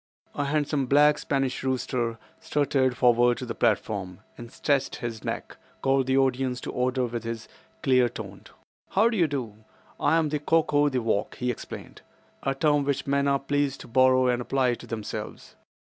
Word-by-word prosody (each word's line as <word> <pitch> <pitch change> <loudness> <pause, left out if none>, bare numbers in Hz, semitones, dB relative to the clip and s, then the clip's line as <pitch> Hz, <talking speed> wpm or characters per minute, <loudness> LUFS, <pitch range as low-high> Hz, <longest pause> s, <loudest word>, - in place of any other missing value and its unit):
A 145 - -2
handsome 145 -1 0
black 145 +2 +5
Spanish 135 -2 -1
rooster 125 -3 -1 0.2
strutted 135 -3 +1
forward 120 0 +4
to 130 - -5
the 115 - -4
platform, 95 -3 -1
and 120 0 -10
stretching 140 -2 0
his 115 -2 -5
neck, - - -5 0.3
called 135 -1 +2
the 130 0 +2
audience 130 -1 +1
to - - -5
order 125 0 0
with 120 -1 -4
his 115 -1 -5 0.4
clear 125 -2 +4
toned - - -9 0.4
"How 215 +4 +3
do 225 - -1
you 170 -4 +4
do? 125 -8 -4 0.4
I 165 - +3
am 160 -2 +1
the 150 0 -1
'Cock 160 +1 +1
o' 145 0 +4
the 130 -3 -1
walk,'" 105 -3 -1
he 125 -1 -1
explained, 120 - -9 0.4
"a 135 0 -1
term 145 0 +2
which 140 -1 -1
men 140 0 +1
are 140 0 +3
pleased 140 0 -1
to - - -11
borrow 130 +1 +4
and 125 -1 +1
apply 130 0 +1
to 120 - -9
themselves. 110 -2 -6
130 Hz, 180 wpm, -26 LUFS, 120-140 Hz, 0.4 s, black